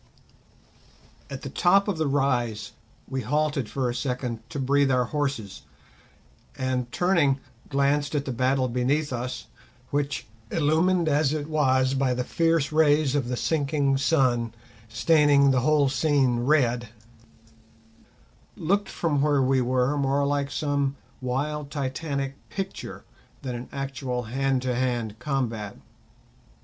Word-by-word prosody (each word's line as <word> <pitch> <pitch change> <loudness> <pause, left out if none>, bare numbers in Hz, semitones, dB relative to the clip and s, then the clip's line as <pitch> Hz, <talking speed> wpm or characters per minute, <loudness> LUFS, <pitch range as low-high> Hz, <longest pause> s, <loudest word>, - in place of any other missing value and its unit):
At - - -7
the - - -5
top 195 +3 +3
of 190 -6 -1
the 160 - +1
rise 120 -7 0 0.4
we 130 0 -3
halted 145 -1 0
for 130 -2 -1
a 120 - -1
second 125 -2 -3
to 165 - -6
breathe 140 +1 +2
our 125 -1 +2
horses; 135 -7 -3 1.0
and, 130 -2 -2
turning, 165 -7 +2 0.3
glanced 145 +1 +1
at 140 -1 0
the 135 - -3
battle 130 +2 +1
beneath 130 +4 0
us, 125 +1 -4 0.5
which, 140 -4 -1 0.2
illumined 165 +3 +2
as 150 -1 +2
it 150 -1 -3
was 130 -4 +2
by 135 -2 +1
the 125 - -1
fierce 165 +1 +1
rays 150 -2 +3
of 140 -4 0
the 125 0 -2
sinking 145 -2 +1
sun 125 -6 +1 0.3
staining 140 +3 +4
the 130 -1 +2
whole 150 +1 +3
scene 135 -3 +2
red, 125 -3 +2 1.7
looked 200 +5 0
from 150 -5 0
where 145 -2 +3
we 130 0 +2
were 130 +3 +1
more 140 +1 +1
like 140 0 0
some 140 -2 -1 0.3
wild 140 +3 -2
titanic 140 0 -3 0.2
picture 195 -1 -6 0.4
than 130 -2 -3
an 120 +1 -7
actual 135 -2 -3
hand 130 +2 -1
to 130 -1 0
hand 120 -3 -2
combat. 120 -7 -3
135 Hz, 135 wpm, -26 LUFS, 125-150 Hz, 1.7 s, staining